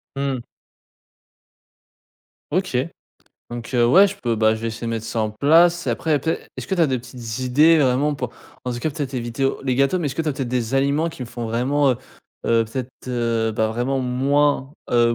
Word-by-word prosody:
Mmh. 135 -2 -1 2.1
OK. 185 -8 0 0.7
Donc, 120 -1 -6
heu, 120 -2 +4
ouais, 190 +11 +7
je 200 - -4
peux 120 - -1
ben, 110 0 +3
je 110 - -7
vais 115 - -3
essayer 115 +1 -5
de - - -2
mettre 115 -1 -3
ça 115 - -2
en 110 -1 0
place. 170 +9 +4
Après, 155 -3 +1
peut-être 160 +4 -1
est - - -21
est-ce - - -5
que 190 - -1
tu 175 - 0
as 160 - +5
des 130 -2 0
petites 120 -2 -7
idées, 150 +6 +5
vraiment, 140 +2 +2
pour, 125 -4 -4 0.3
en 125 - -2
tout 120 - -4
cas 155 +6 -1
peut-être 140 -3 -4
éviter, 120 +1 -2
heu, 135 - +1
les 130 -2 +1
gâteaux. 140 +7 +2
Mais, 160 - -1
est-ce 135 - -3
que - - -1
tu 160 - -2
as - - +1
peut-être 130 -2 -3
des 125 0 -1
aliments 140 +4 +2
qui 160 -5 -8
me - - -5
font 120 0 -5
vraiment, 135 +5 +2
heu - - -4 0.5
heu, 115 -1 +3
peut-être, 125 +3 -5 0.2
heu, 115 -2 0
bah, 110 0 +1
vraiment 125 +4 -1
moins, 135 +2 +1 0.2
heu, 120 -1 +4
130 Hz, 220 wpm, -22 LUFS, 120-145 Hz, 2.1 s, ouais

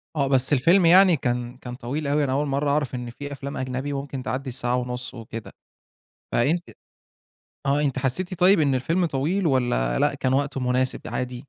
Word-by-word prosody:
آه. 140 -2 +1
بس 130 +1 +2
الفيلم 170 +8 +4
يعني 180 0 +6
كان 120 -1 -2
كان 125 -1 -8
طويل 140 +4 -4
أوي 145 +1 +2
أنا 130 - -1
أول 145 +2 0
مرّة 140 +1 0
أعرف 145 -3 0
إن 125 -1 -5
في 145 +4 -8
أفلام 140 +1 -6
أجنبي 130 +2 -3
ممكن 140 -1 -5
تعدّي 130 +1 -3
الساعة 125 0 -1
ونُص 125 0 -4
وكده. 115 -2 -8 0.8
فأنتِ 160 +9 +1 1.0
آه. 140 +2 +2
أنتِ 135 -3 0
حسّيتِ 175 +9 -1
طيب 185 0 +6
إن 140 -3 +2
الفيلم 165 +8 +1
طويل 165 +6 0
والّا - - +1
لأ - - +2
كان 130 0 0
وقته 140 0 0
مناسب 125 +1 0
عادي؟ 125 -1 -4
135 Hz, 185 wpm, -24 LUFS, 125-145 Hz, 1.0 s, يعني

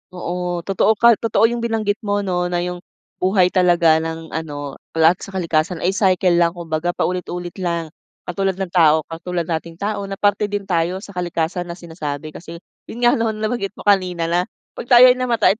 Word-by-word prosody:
Oo. 175 -1 -3
Totoo 200 +3 +2
ka 235 +1 +5
totoo 225 -1 +1
'yong 240 - -2
binanggit 220 -2 -1
mo 205 -2 -1
'no, 180 -2 -1
na 175 0 -1
'yong 180 0 -4 0.4
buhay 185 -1 +3
talaga 170 -3 +4
ng 160 0 -6
ano, 145 -3 -5 0.2
lahat 165 +2 +4
sa 195 - -9
kalikasan 165 -1 -1
ay 185 - +2
cycle 185 -3 +2
lang, 170 0 +2
kumbaga 170 0 -3
paulit-ulit 180 -1 -3
lang, 170 -3 -2 0.3
katulad 190 +1 -1
ng 190 -2 -4
tao. 160 -3 +4
Katulad 170 +1 -4
nating 165 0 -3
tao 200 +1 -3
na 195 - -5
parte 205 +1 +1
din 205 -1 -3
tayo 180 +2 -1
sa 200 - -10
kalikasan 175 0 -2
na 170 - -6
sinasabi. 155 -3 -6
Kasi 170 +1 -10 0.3
'yon 240 +2 -7
nga 240 -1 +4
'no, 220 -1 0
nabanggit 215 -2 -3
mo - - -11
kanina 180 -4 +1
na 175 - +3 0.4
'pag 240 - -6
tayo 250 0 +8
ay - - +1
namatay 230 -4 +2
180 Hz, 190 wpm, -20 LUFS, 170-200 Hz, 0.4 s, tayo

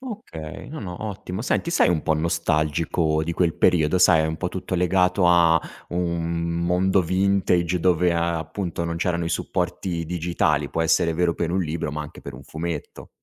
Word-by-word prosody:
Okay, 200 - -8
no, 155 - -7
no, 90 -4 -6
ottimo. 95 -1 -5
Senti, 165 +6 0
sei 170 - +4
un 85 -3 +1
po' 80 - +1
nostalgico 80 0 0
di 85 +2 -2
quel 85 -1 +1
periodo? 85 0 +3
Sai, 80 -3 +5
è - - 0
un 80 0 -3
po' 90 - -2
tutto 95 +1 -5
legato 90 0 +2
a 85 -2 +5 0.3
un 85 -1 -1
mondo 95 +2 +2
vintage, 90 -1 +1
dove, 90 0 +2
ehm, 85 - 0
appunto 85 +2 -2
non 85 0 -3
c'erano 85 0 -1
i - - -2
supporti 85 0 -2
digitali, 80 -3 0
può 80 - 0
essere 80 0 +2
vero 85 0 +1
per 85 0 -2
un 95 - +1
libro 80 -3 -3
ma 75 0 -3
anche 75 +1 -11
per 70 - -9
un 65 - -11
fumetto. 80 +1 -6
85 Hz, 185 wpm, -23 LUFS, 80-90 Hz, 0.3 s, Sai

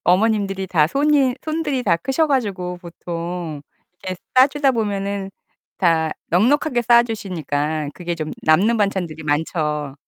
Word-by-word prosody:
어머님들이 195 0 +2
다 160 -5 +3
손이 275 - +2
손들이 310 -4 -2
다 175 -7 +3
크셔 270 - 0
가지고 200 -10 -1
보통 170 -2 -6 0.4
이렇게 185 0 -4 0.2
싸 255 +1 +8
주다 285 -1 +1
보면은 200 -3 -2 0.5
다 165 -3 +2 0.2
넉넉하게 245 - +2
싸 235 0 +6
주시니까 160 -9 -3
그게 175 -1 -4
좀 155 -2 -5
남는 195 +9 +4
반찬들이 190 -7 -1
많죠. 150 -1 -1
190 Hz, 290 characters per minute, -21 LUFS, 165-240 Hz, 0.5 s, 싸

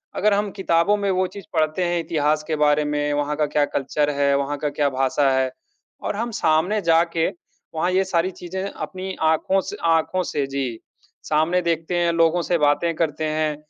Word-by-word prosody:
अगर 210 -1 +2
हम 205 0 0
किताबों 190 +1 +2
में 200 -1 -1
वो 185 0 +1
चीज़ 200 -1 -11
पढ़ते 155 +2 +1
हैं, 175 0 0
इतिहास 155 -2 0
के 155 - 0
बारे 150 0 +3
में, 145 0 -1
वहाँ 145 +1 -1
का 150 - +2
क्या 145 -1 +4
कल्चर 145 +2 0
है, 140 0 +3
वहाँ 140 +1 -2
का 150 +1 -2
क्या 145 0 0
भाषा 135 +1 +1
है 130 -1 +1 0.5
और - - -2
हम 230 +2 -3
सामने 175 +7 +2
जाके 165 0 +2 0.5
वहाँ 170 +3 0
ये 190 +1 +3
सारी 185 0 0
चीज़ें 185 +2 -6
अपनी 190 0 -6
आँखों 160 +5 +2
से - - -7
आँखों 180 +3 +1
से 145 -4 -2
जी, 135 -4 -3 0.4
सामने 160 +4 +1
देखते 165 +1 -1
हैं, 170 -1 +2
लोगों 165 +1 +3
से 175 - +1
बातें 150 +3 +2
करते 155 -1 -1
हैं 155 -1 0
160 Hz, 195 wpm, -22 LUFS, 150-180 Hz, 0.5 s, क्या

